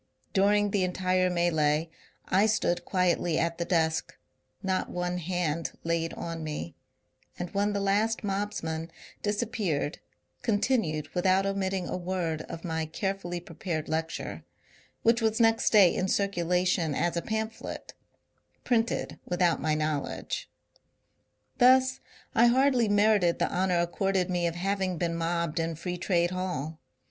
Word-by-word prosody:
Dur 200 +1 +4
ing 205 -1 +2
the 195 -2 +2
entire 185 0 +1
melee 160 -3 +2 0.4
I 195 +4 +4
stood 175 -5 0
quietly 175 -3 +1
at 170 0 0
the 170 - 0
desk, 160 -2 0 0.5
not 190 -1 0
one 180 0 -2
hand 170 -2 -2
laid 165 0 0
on 165 -1 -5
me, 150 - -5 0.6
and 175 -1 -5
when 205 +1 +1
the 200 - 0
last 205 +4 +1
mobsman 195 -5 -2 0.3
disappeared 205 -8 -1 0.4
continued 205 - 0
without 185 +2 +3
omitting 195 -2 -1
a - - -2
word 175 -3 -2
of 165 - -7
my 160 -2 -2
carefully 175 0 -3
prepared 165 -2 -4
lecture, 160 +1 -3 0.3
— - - -31
which 230 +1 +4
was 220 0 +1
next 225 0 +4
day 200 -5 +6
in 185 - 0
circulation 180 -4 +1
as 175 0 0
a 170 - 0
pamphlet 220 +2 -4 0.7
(printed 230 -2 0
without 175 -1 +1
my 155 -1 +1
knowledge). 155 -2 -2 1.1
Thus 260 +1 +5 0.3
I 235 +1 +6
hardly 255 -2 +3
merited 205 -4 +4
the - - 0
honour 180 -1 +2
accorded 185 +1 0
me 175 -1 +1
of 165 - -3
having 190 0 -1
been 170 0 -1
mobbed 170 -1 -1
in 165 0 -1
Free 175 +2 -4
Trade 175 -1 +1
Hall. 165 -4 -3
180 Hz, 140 wpm, -28 LUFS, 165-200 Hz, 1.1 s, day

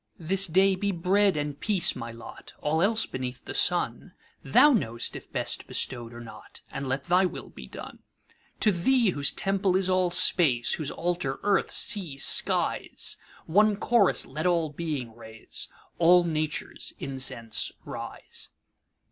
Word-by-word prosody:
This 190 +4 +2
day 190 +4 +3
be 200 +2 -1
bread 190 +1 +2
and 145 -1 -4
peace 200 -5 +1
my 115 0 -6
lot:All 150 +6 -5
else 220 +4 +3
beneath 130 -1 -6
the - - -6
sunThou 260 - +2
know'st 120 - -2
if - - -10
best - - -2
bestow'd 120 -2 -2
or 120 - -10
not, 120 -1 -12
And 140 - -5
let 135 +1 -1
thy 180 +3 +3
will - - -9
be 65 - -11
done. - - -10 0.6
To 210 - +5
Thee, 220 +4 +2
whose 145 -3 +1
temple 195 -1 0
is 190 0 +1
all 185 -1 +2
Space, 155 -8 +3
Whose 155 -3 -3
altar 170 -6 -3
earth, 200 -1 +1
sea, 175 -10 +1
skies, - - +2 0.3
One 210 +5 +3
chorus 210 -1 +3
let 155 +6 -3
all 170 -4 +1
Being 145 -8 -5
raise, 110 -1 -7 0.3
All 175 +1 +6
Nature's 155 -2 -3
incense 130 -4 -2
rise! - - -8
170 Hz, 145 wpm, -26 LUFS, 135-195 Hz, 0.6 s, All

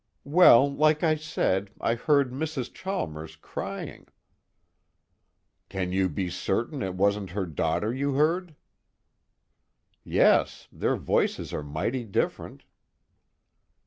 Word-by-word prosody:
"Well, 140 -4 +7
like 155 +2 +2
I 160 -2 +4
said, 105 -11 -1
I 115 - +1
heard 140 +2 +2
Mrs. 140 -2 -4
Chalmers 80 - -5
crying." 80 - -7 1.6
"Can 95 -2 -3
you 95 0 +1
be 90 +4 -3
certain 120 - -2
it 95 -4 -3
wasn't 100 0 +1
her 95 - 0
daughter 80 +7 -1
you 140 +2 -1
heard?" 160 +4 0 1.5
"Yes. - - +2
Their - - -1
voices - - -1
are - - -2
mighty 90 - -3
different." 105 -4 -3
120 Hz, 110 wpm, -26 LUFS, 95-150 Hz, 1.6 s, Well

